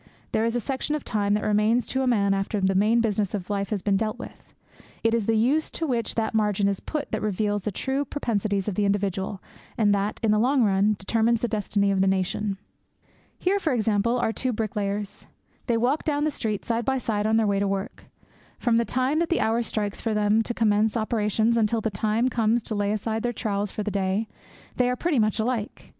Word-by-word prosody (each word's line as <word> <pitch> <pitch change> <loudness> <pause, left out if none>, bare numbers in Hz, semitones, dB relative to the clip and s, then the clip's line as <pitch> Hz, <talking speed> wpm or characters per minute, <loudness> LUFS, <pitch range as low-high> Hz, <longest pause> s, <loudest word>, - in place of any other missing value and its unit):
There 220 - +1
is 230 +1 0
a - - +2
section 270 +4 -2
of 300 - -4
time 205 -2 0
that 210 - -1
remains 215 +3 +2
to 265 +3 -1
a 260 - 0
man 200 -5 +3
after 195 +2 -1
the 190 0 +2
main 215 +5 +3
business 210 -3 0
of 195 0 -5
life 200 -1 -1
has 205 -4 -2
been 200 -2 +2
dealt 215 +2 -2
with. - - -11 0.5
It 225 0 +3
is 230 -3 0
the 225 -1 +3
use 275 +8 +2
to 330 - -3
which 235 -6 -1
that 220 -1 -1
margin 210 -2 +2
is 200 -1 -1
put 300 -2 -4
that 220 - -2
reveals 205 0 0
the 210 - -3
true 265 +8 -1
propensities 215 -8 -2
of 210 - -1
the 205 +2 0
individual 195 -1 -1 0.3
and 210 -2 +3
that, 200 +1 -1
in 220 - +3
the 210 - +3
long 255 +2 +3
run, 205 +1 +3
determines 225 +4 +1
the 240 - +1
destiny 205 -2 0
of 195 -1 +1
the 195 - +3
nation. 195 +1 0 0.8
Here, 390 +2 +1
for 320 -7 0
example, 225 0 +1
are 225 -2 0
two 255 +2 -1
bricklayers. 210 -2 -3 0.4
They 235 -2 +2
walk 255 +6 +1
down 295 -2 0
the 310 - +1
street 215 -7 -3
side 235 0 0
by 265 +3 0
side 215 -4 -1
on 220 +1 +3
their 225 - +3
way 200 -1 +1
to 200 - +1
their - - 0
work. 195 0 -4 0.5
From 235 -2 +2
the 235 - +2
time 260 +6 0
that 335 - 0
the 340 - +1
hour 225 +2 +1
strikes 210 -3 -2
for 225 -2 -1
them 210 +1 +3
to 240 - -2
commence 215 0 +2
operations 220 0 +1
until 225 0 +2
the 220 0 -2
time 215 +5 +1
comes 230 -1 +1
to 225 - -4
lay 205 -1 0
aside 220 +1 -2
their 240 +1 -1
trowels 205 -3 -2
for 210 - -4
the 210 - -3
day, 195 +2 0 0.5
they 250 -1 +3
are 250 - 0
pretty 310 0 0
much 215 -1 +2
alike. 230 -1 -3
215 Hz, 230 wpm, -25 LUFS, 205-235 Hz, 0.8 s, man